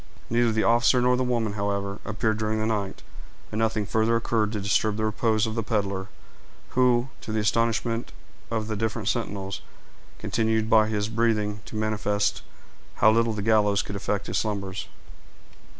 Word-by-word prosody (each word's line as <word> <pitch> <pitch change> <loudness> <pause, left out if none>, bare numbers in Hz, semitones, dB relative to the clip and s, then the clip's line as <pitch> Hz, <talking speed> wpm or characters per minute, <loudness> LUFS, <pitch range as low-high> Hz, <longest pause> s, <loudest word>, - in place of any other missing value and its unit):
Neither 120 0 +3
the 110 0 +1
officer 120 +2 +4
nor 125 +1 +3
the 130 - 0
woman, 120 -4 0
however, 100 -1 -2
appeared 110 0 -1
during 110 0 0
the 110 - 0
night, 105 -3 -2 0.5
and 110 - -2
nothing 110 -2 +1
further 110 +3 +2
occurred 115 -2 +1
to 105 - -2
disturb 100 +1 +1
the 110 - 0
repose 110 0 +1
of 110 - -3
the 115 - -1
peddler, 100 -4 -1 0.6
who, 125 0 +3
to 110 - -6
the 110 - 0
astonishment 115 +2 0 0.4
of 110 -2 -2
the 110 - -2
different 110 0 -1
sentinels, 100 -5 -3 0.6
continued 110 -1 0
by 110 -1 +6
his 105 -1 -1
breathing 110 -2 0
to - - -9
manifest 105 -1 0 0.5
how 110 - +5
little 115 0 +2
the 105 -2 -3
gallows 105 -2 +3
could 100 - -6
affect 100 +1 -2
his - - -1
slumbers. 100 -3 -3
110 Hz, 165 wpm, -26 LUFS, 105-115 Hz, 0.6 s, by